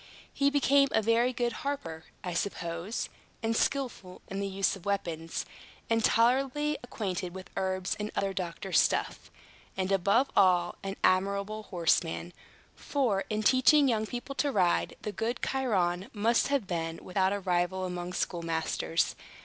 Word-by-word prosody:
He 280 0 +3
became 280 0 +4
a 220 - +4
very 230 +3 +3
good 240 -1 -1
harper, 165 - -4 0.2
I 180 - -3
suppose, 170 +2 -3 0.4
and 225 0 +1
skilful 240 -9 -2
in 195 - -4
the 200 - -1
use 195 0 0
of 190 - -12
weapons, 165 -5 -2 0.5
and 225 0 +3
tolerably 270 +7 +3
acquainted 190 -7 -4
with 185 0 -9
herbs 185 -1 -1
and 210 0 -2
other 195 -1 0
doctor's 185 +1 0
stuff, - - 0 0.5
and, 190 0 -1
above 200 +8 +3
all, 180 -3 +4
an 195 0 -4
admirable 200 +3 +1
horseman; 170 -1 0 0.4
for, 235 -9 0
in 215 0 -1
teaching 270 +5 +5
young 220 -3 +1
people 245 +4 -5
to 285 +1 0
ride, 180 -7 +2
the 210 - -3
good 225 +4 -2
Chiron 190 -9 0
must 225 +2 +2
have 280 -6 0
been 165 -3 -3
without 190 +1 +1
a 205 - -1
rival 185 0 0
among 180 0 -4
schoolmasters. 165 -1 -1
195 Hz, 150 wpm, -30 LUFS, 180-240 Hz, 0.5 s, teaching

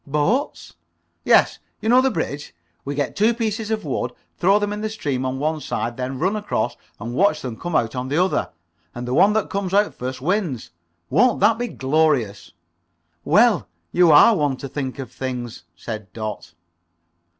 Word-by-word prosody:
"Boats?" 150 - -1 0.5
"Yes. - - +4 0.2
You - - -5
know 250 +2 +6
the 265 - +2
bridge. 150 - -4 0.3
We 140 +1 -4
get 145 -1 -2
two 225 +3 +3
pieces 220 -1 -2
of 220 -1 -2
wood, 125 -3 -2 0.2
throw 195 +3 +3
them 205 0 -1
in 210 - -5
the 215 - -2
stream 140 -11 -2
on 130 +1 -3
one 155 +2 -1
side, 120 -2 -3
then 130 +1 -4
run 185 +9 0
across 205 - -2 0.2
and 115 +3 -5
watch 170 +2 +2
them 125 -3 -4
come 175 +6 -5
out 115 -5 +1
on 125 0 -3
the 145 +3 -1
other. 185 +2 +1 0.5
And 120 0 -5
the 125 - -2
one 195 +8 +5
that 220 -1 -1
comes 195 -1 -2
out 205 +1 +3
first, 130 +1 -5
wins. 165 - -2 0.4
Won't 235 - +3
that 225 0 +4
be 245 - -1
glorious?" 135 - 0 0.7
"Well, 210 - +4 0.2
you 175 -2 +5
are 185 +10 +7
one 145 -6 0
to 140 - -6
think 135 -1 -4
of 135 -4 -7
things," 125 -7 -5
said 110 0 -7
Dot. 105 -6 -6
150 Hz, 185 wpm, -22 LUFS, 125-205 Hz, 0.7 s, are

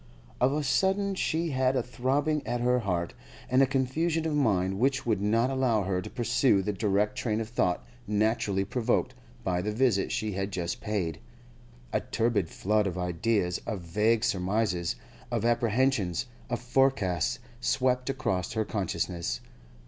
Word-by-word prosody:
Of 125 +2 +4
a 150 0 0
sudden 195 +8 +2
she 165 -3 -1
had 130 0 +2
a 125 - +1
throbbing 135 +5 0
at 120 - -1
her 125 +1 +2
heart, 90 -6 -2 0.4
and 130 +1 +5
a 135 - +5
confusion 155 +5 0
of 160 - 0
mind 95 -9 +1
which 135 +2 +1
would 110 -5 +1
not 115 +5 +2
allow 125 -6 +2
her 95 -1 -1
to - - -7
pursue 120 -3 +2
the 105 - -1
direct 105 +3 +1
train 115 -4 -1
of 110 - -3
thought 90 -6 0 0.2
naturally 105 -2 +1
provoked 115 +3 0 0.3
by 90 -1 0
the 105 - -2
visit 110 -3 +2
she 110 -1 -1
had 95 0 -2
just 85 -2 -3
paid. 90 -8 -2 0.7
A - - +3
turbid 110 -7 0
flood 105 +1 +1
of 90 -2 -3
ideas, 90 +1 0
of 105 -5 -3
vague 105 +7 +1
surmises, 95 -2 0 0.3
of 115 -2 -1
apprehensions, 115 -5 +1 0.2
of 120 - -1
forecasts, 120 - +1 0.2
swept 125 0 +1
across 95 -9 -1
her 110 0 0
consciousness. 85 - -2
110 Hz, 155 wpm, -28 LUFS, 95-130 Hz, 0.7 s, and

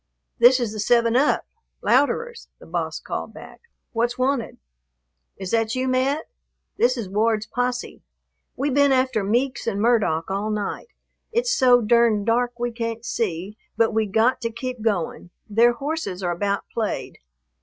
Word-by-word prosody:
"This 250 +2 +7
is 235 -4 -1
the 215 - -6
7 235 +2 +3
Up, 280 +4 +2 0.4
Louderer's," 460 - +1
the - - -15
boss - - -3
called - - -6
back; - - -12 0.3
"what's 240 +1 -1
wanted?" 255 -2 -1 0.8
"Is 190 -1 -6
that 225 0 +1
you, 255 0 -1
Mat? 265 +4 +1 0.5
This 250 +2 +2
is 225 -5 -4
Ward's 215 +2 +1
posse. 245 +2 -3 0.5
We 280 +2 -1
been 285 +1 +4
after 255 -5 +2
Meeks 245 +7 0
and 200 -3 -1
Murdock 205 -8 +1
all 200 +2 -1
night. 210 - -3 0.4
It's 485 +2 +1
so 250 - +5
durned 225 -2 +3
dark 240 +1 +1
we 240 0 -2
can't 230 0 -4
see, 200 -1 -3 0.2
but 225 0 +3
we 220 -1 +1
got 225 +7 +2
to 230 - -1
keep 250 +1 -5
going; 195 -5 -2 0.2
their 230 +3 +4
horses 240 - -4
are 175 - 0
about 200 +3 -1
played. 220 -2 -3
235 Hz, 155 wpm, -23 LUFS, 215-255 Hz, 0.8 s, This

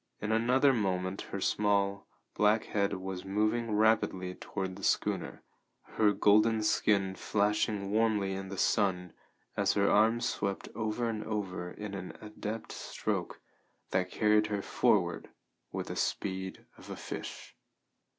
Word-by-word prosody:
In 105 - -2
another 125 +5 +4
moment 95 -4 -1
her 100 - -4
small, 100 0 +1 0.3
black 105 +1 +3
head 100 -1 0
was 95 0 -5
moving 110 +4 0
rapidly 105 -4 +2
toward 95 0 -5
the 100 - -11
schooner, - - 0 0.4
her 105 -2 +2
golden 110 +2 +4
skin 100 -2 +2
flashing 105 0 0
warmly 105 -3 +2
in 95 0 -5
the 95 - -6
sun 90 -4 +1 0.4
as - - +2
her 100 0 +3
arms 115 +3 +4
swept 100 -1 -2
over 110 +2 -1
and 110 -2 -3
over 95 -5 -3
in 105 +2 -7
an 95 -2 -6
adept 105 +1 -6
stroke - - -3 0.5
that 90 0 +1
carried 105 +1 +3
her 105 -2 -2
forward - - +1 0.4
with - - -3
the - - -5
speed 95 -1 -3
of - - -13
a - - -5
fish. - - -7
105 Hz, 140 wpm, -31 LUFS, 95-110 Hz, 0.5 s, another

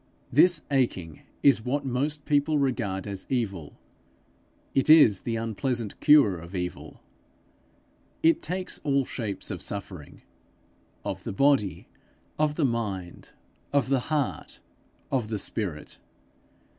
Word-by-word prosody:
This 165 +3 +5
aching 95 - -1 0.2
is 135 -6 +5
what 140 +4 -1
most 140 +4 -2
people 150 +1 +2
regard 120 -9 -1
as 100 -2 -6
evil: 100 - -3 1.0
it 135 +2 +1
is 145 -11 +7
the 115 - -3
unpleasant 115 0 -3
cure 140 - +5
of 85 +4 -10
evil. 90 -1 -6 1.2
It 165 +1 +4
takes 180 +3 -4
all 140 -2 +1
shapes 110 -6 -5
of - - -5
suffering 95 -6 -7 0.8
of - - -4
the - - -4
body, 135 -2 +2 0.5
of 155 -1 +1
the 150 - +1
mind, 100 -8 -4 0.4
of 140 -3 +1
the 135 -1 +3
heart, 150 -4 -2 0.5
of 125 -5 0
the 110 - -2
spirit. 95 -6 -4
125 Hz, 120 wpm, -27 LUFS, 100-145 Hz, 1.2 s, is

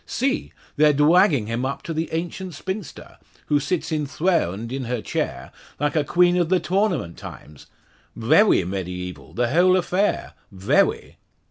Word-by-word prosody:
See! 275 +4 -1 0.3
They're 150 0 +5
dwagging 150 - +4
him 115 +3 -3
up 135 +1 -3
to 165 - -4
the 160 +1 -2
ancient 175 +1 -4
spinster, 190 +3 -7 0.3
who 145 - +3
sits 165 +4 -2
enthawned 150 - -1
in 135 -1 -3
her 125 0 -2
chair - - -4 0.3
like 145 +1 0
a 155 - +2
queen 175 +3 +3
of 175 -2 +1
the 185 -1 +3
Tawnament 180 - -1
times. 75 -2 -11 0.5
Vewy - - +4
mediaeval 90 -5 -6
the 120 0 0
whole 180 +4 +4
affair 185 +3 0 0.2
vewy!" 95 0 0
150 Hz, 145 wpm, -23 LUFS, 120-180 Hz, 0.5 s, They're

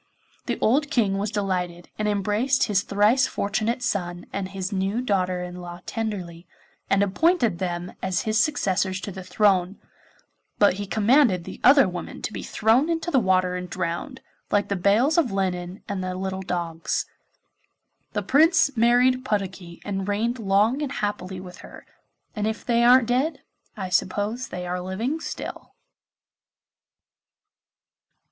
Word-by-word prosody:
The - - -1
old 285 +7 +2
King 205 -8 +1
was 205 +1 -1
delighted, 180 -4 -3
and 215 - 0
embraced 210 +7 +1
his 200 -3 +2
thrice 210 +6 +3
fortunate 215 +4 -1
son 175 -7 -2
and 195 -1 -3
his 190 0 -4
new 195 +3 -1
daughter 185 -6 0
in 180 0 -7
law 175 0 -8
tenderly, 185 -7 -5 0.4
and 195 0 +3
appointed 230 - +2
them 175 -1 -3
as 185 -2 -1
his 215 0 +2
successors 195 -9 0
to 200 - -5
the 190 - -8
throne. 195 -1 +2 0.8
But 205 -2 +5
he 200 - -5
commanded 220 - +3
the - - -9
other 275 -4 +7
women 175 -2 -7
to 220 - -3
be - - -5
thrown 235 +8 +2
into 330 +1 -1
the 270 - +4
water 185 -3 +2
and 180 0 -5
drowned, 185 - -4 0.3
like 205 0 +1
the 200 - 0
bales 220 - +3
of 280 -10 +1
linen 185 -1 -2
and 200 -3 -3
the 185 0 -3
little 190 0 -3
dogs. 170 -3 -2 1.1
The 210 -2 -1
Prince 290 - +4
married 245 +2 +3
Puddocky 190 -6 -3
and 195 -1 -3
reigned 230 +4 -1
long 210 +6 +2
and 280 -2 -3
happily 195 -3 -3
with 180 -1 -10
her, - - -13 0.5
and 210 -1 -1
if 220 -1 -4
they 235 -1 +2
aren't 245 0 +6
dead 270 +5 0 0.3
I 190 -3 -4
suppose 205 +7 -1
they 180 0 -6
are 180 +1 -3
living 220 - -2
still. - - -7
200 Hz, 155 wpm, -24 LUFS, 185-235 Hz, 1.1 s, other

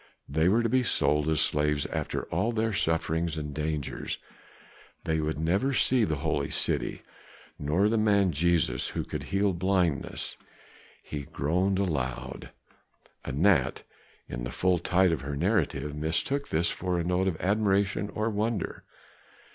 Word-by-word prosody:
They 80 +4 +2
were 115 +4 +3
to - - +2
be 130 +3 +3
sold 75 -10 +2
as 80 -2 +3
slaves 75 -1 +2
after - - -3
all 115 - +1
of 120 - -3
their 110 0 0
sufferings 80 -2 0
and 75 -1 -4
dangers; 75 -1 -3 0.9
they 80 -1 0
would 80 0 -1
never 95 +12 +1
see 125 -3 +4
the 80 - -1
Holy 75 -3 0
City, - - -1 0.6
nor 80 +8 +2
the 110 +1 +2
man 100 -3 +3
Jesus 85 +2 +1
who - - 0
could - - -5
heal 100 0 +1
blindness. 90 -4 0 0.7
He 75 - -5
groaned 90 +9 0
aloud. 65 -9 -3 0.7
Anat, 70 0 +2 0.4
in - - -5
the - - -3
full 90 +6 +1
tide 90 +1 +3
of 80 - -1
her 70 +1 -4
narrative, 75 -5 0
mistook 85 - 0
this 85 +2 +1
for 90 -1 -2
a - - 0
note 90 +2 +1
of 85 -4 -1
admiration 100 0 +1
or 110 +1 0
wonder. 105 0 -2
85 Hz, 150 wpm, -28 LUFS, 75-100 Hz, 0.9 s, see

